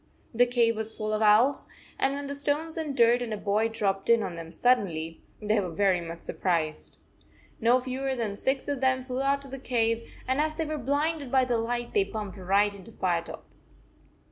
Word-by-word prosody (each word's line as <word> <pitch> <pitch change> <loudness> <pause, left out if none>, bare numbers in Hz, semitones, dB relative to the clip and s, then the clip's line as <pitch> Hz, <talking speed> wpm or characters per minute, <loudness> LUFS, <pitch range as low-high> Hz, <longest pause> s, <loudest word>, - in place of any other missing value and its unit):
The 245 +2 +4
cave 235 -2 +2
was 220 0 -3
full 215 -1 -3
of 215 - 0
owls, 220 +6 +4 0.3
and 275 +1 +2
when 285 0 -5
the 280 - -4
stones 290 +3 -1
and 305 -4 -3
dirt 235 +1 +5
and 240 -2 -4
a 215 - -2
boy 210 +2 +1
dropped 200 -3 -1
in 230 -2 +5
on 180 - -4
them 165 -1 -8
suddenly, 170 -11 0 0.2
they 215 0 +1
were 185 -3 -2
very 185 +1 +2
much 165 0 -7
sur - - -6
prised. 165 -4 -2 0.6
No 240 +2 +4
fewer 260 +1 -3
than 220 -5 -2
six 265 +5 -1
of 285 -2 -2
them 260 -1 +2
flew 255 0 -3
out 280 0 +1
of 270 - -11
the 270 - -6
cave, 230 -2 0 0.2
and 260 +3 +2
as 310 0 -1
they 320 0 -2
were 305 0 -3
blinded 285 +2 -1
by 260 0 +3
the 240 -2 0
light, 240 +1 -3
they 410 - +4
bumped 210 - -6
right 200 +3 +2
into 200 +2 -12
Firetop. 175 -5 -2
235 Hz, 210 wpm, -27 LUFS, 205-270 Hz, 0.6 s, dirt